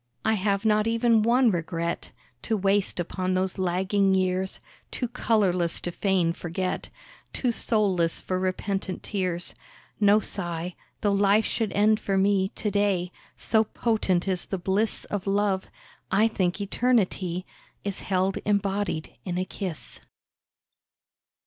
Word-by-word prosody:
I 220 - +4
have 200 0 0
not 215 0 +3
even 230 -1 +3
one 240 +2 +4
regret 170 -1 -3 0.3
To 220 - 0
waste 195 -1 +1
upon 185 +2 -1
those 185 0 -1
lagging 190 +2 +2
years, 185 0 0 0.3
Too 245 - -3
colourless 195 -8 +1
to 175 - -3
feign 180 -3 +1
forget, 175 +2 -3 0.4
Too 250 - +1
soulless 195 -8 +1
for 185 0 -2
repentant 190 0 -2
tears. 185 -4 -2 0.5
No 205 0 +6
sigh, 175 -4 -3 0.3
though 205 - +2
life 200 +2 +4
should 225 -3 -1
end 215 +1 +4
for 195 -1 -1
me 195 0 +3
To 210 0 -3
day; 195 -3 +1 0.3
so 220 -1 +2
potent 210 -5 0
is 185 -2 -1
the 195 - -2
bliss 195 +5 0
Of 200 -1 -4
love, 195 -1 +1 0.4
I 210 +4 +4
think 185 -4 -1
eternity 195 -4 0 0.4
Is 200 -2 -3
held 190 0 0
embodied 200 -5 -1
in 180 -2 -3
a 185 - 0
kiss. 185 -4 -5
195 Hz, 135 wpm, -26 LUFS, 185-210 Hz, 0.5 s, No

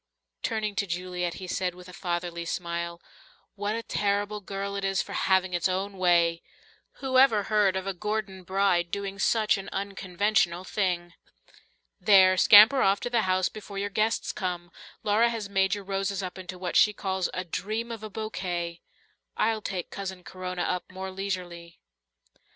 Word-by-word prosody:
Turning 215 -2 -1
to 200 - -1
Juliet, 180 -1 -3
he 190 - -7
said 180 0 -2
with 180 0 -12
a 180 - -11
fatherly 175 -1 -3
smile, 170 0 -3 0.5
"What 205 +1 -2
a 230 - -3
terrible 205 0 -1
girl 200 +1 -4
it 200 - -3
is 195 -1 +1
for - - -3
having 190 -1 +2
its 175 +1 +1
own 195 +2 -2
way! 170 -2 +3 0.5
Who 260 -1 +1
ever 225 -6 +5
heard 205 -2 +2
of 190 0 -2
a 195 - -2
Gordon 210 0 -3
bride 185 -2 +1
doing 195 +1 -4
such 215 0 +2
an 195 - -7
unconventional 195 -2 0
thing? 180 -3 -1 0.9
There, 190 -3 +6
scamper 215 +8 +8
off 195 +1 +3
to 245 - -3
the 235 -2 +3
house 185 0 +3
before 205 -2 -9
your 200 +1 -2
guests 215 +3 0
come. 175 -2 -4 0.3
Laura 215 +3 +3
has 225 -4 -4
made 195 0 +2
your 205 - -7
roses 195 0 -2
up 185 0 -6
into 185 0 -7
what 180 -1 -4
she 210 - +6
calls 190 -2 -2
'a 185 - -2
dream 215 +7 -3
of 225 -2 -6
a 215 - -6
bouquet,' 175 -5 -4 0.6
I'll 220 0 +1
take 185 -4 -4
Cousin 190 -2 -6
Corona 185 -1 -4
up 180 0 -2
more 190 0 -6
leisurely." 180 -3 -5
190 Hz, 170 wpm, -27 LUFS, 180-205 Hz, 0.9 s, scamper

